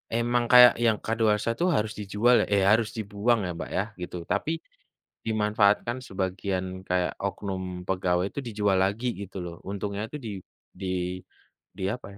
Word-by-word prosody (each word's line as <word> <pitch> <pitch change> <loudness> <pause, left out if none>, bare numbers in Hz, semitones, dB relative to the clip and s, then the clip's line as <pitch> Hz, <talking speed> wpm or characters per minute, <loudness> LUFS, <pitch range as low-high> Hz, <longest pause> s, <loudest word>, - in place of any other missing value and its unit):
emang 120 +1 +1
kayak 125 -1 +10
yang 110 -2 +4
kadaluarsa 110 0 +1
tuh 180 - +2
harus 105 0 0
dijual 105 +5 +3
ya - - 0
eh, 100 -1 +4
harus 110 0 +3
dibuang 110 +2 +1
ya, - - -3
Mbak, - - -5
ya, 95 - +2 0.2
gitu. 90 0 -5
Tapi 160 - 0 0.7
dimanfaatkan 105 +2 +2
sebagian 95 0 -2 0.2
kayak 90 -1 +1
oknum 95 -2 -4
pegawai 90 0 +1
itu - - -5
dijual 105 -3 +1
lagi 110 +6 -2
gitu 100 -1 -8
loh, 85 -1 -7
untungnya 100 +1 -3
itu - - -8
di 105 - -4 0.5
di 95 - -3 0.9
di 95 - -5
apa 125 -3 -6
105 Hz, 160 wpm, -27 LUFS, 95-115 Hz, 0.9 s, kayak